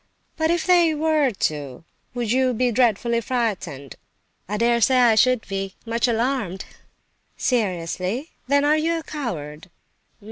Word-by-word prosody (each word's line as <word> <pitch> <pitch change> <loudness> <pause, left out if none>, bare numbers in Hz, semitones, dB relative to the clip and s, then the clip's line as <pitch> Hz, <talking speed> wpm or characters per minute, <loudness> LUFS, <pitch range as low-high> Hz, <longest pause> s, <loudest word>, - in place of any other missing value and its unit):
"But 320 -1 0
if 340 -1 0
they 345 -3 +4
were 305 -2 +2
to, 150 - -3 0.3
would 240 -3 -2
you 255 0 +2
be 245 +2 +1
dreadfully 235 0 +1
frightened?" 200 - -3 0.5
"I 210 - -2
dare 235 +1 +2
say 260 +2 +4
I 240 -2 +5
should 250 +1 +2
be—much 200 +5 -3
alarmed!" 230 -5 -1 0.7
"Seriously? 195 - -2 0.2
Then 285 +1 +3
are 300 +1 +4
you 330 +2 0
a 325 - -6
coward?" 175 - -6
235 Hz, 135 wpm, -22 LUFS, 195-275 Hz, 0.7 s, I